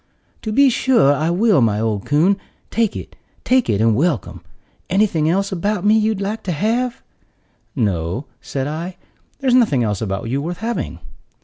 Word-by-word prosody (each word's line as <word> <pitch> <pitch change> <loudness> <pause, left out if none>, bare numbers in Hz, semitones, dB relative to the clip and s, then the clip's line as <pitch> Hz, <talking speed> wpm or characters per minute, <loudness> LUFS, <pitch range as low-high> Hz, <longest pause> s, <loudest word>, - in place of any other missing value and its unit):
"To 220 - -4
be 275 +4 +5
sure 230 - +3
I 155 +3 0
will, 195 - +3
my 105 -3 +2
old 110 -3 -2
coon; 170 +7 +3 0.3
take 225 -2 +1
it, - - -8 0.3
take 255 -1 +2
it, 100 - +1
and 110 0 +3
welcome. 145 - -1 0.5
Anything 180 -6 +2
else 195 +3 0
about 200 +2 -1
me 210 +1 +5
you'd 220 -2 +1
like 205 +3 -3
to 185 - -1
have?" 235 - -1 0.7
"No," 100 - -1 0.2
said 135 -1 -3
I, 165 +5 -5 0.4
"there's 260 -2 +2
nothing 215 - +4
else 105 -3 -1
about 95 0 -3
you 135 +4 -1
worth 170 +3 -4
having." 230 +2 -3
175 Hz, 170 wpm, -19 LUFS, -, 0.7 s, be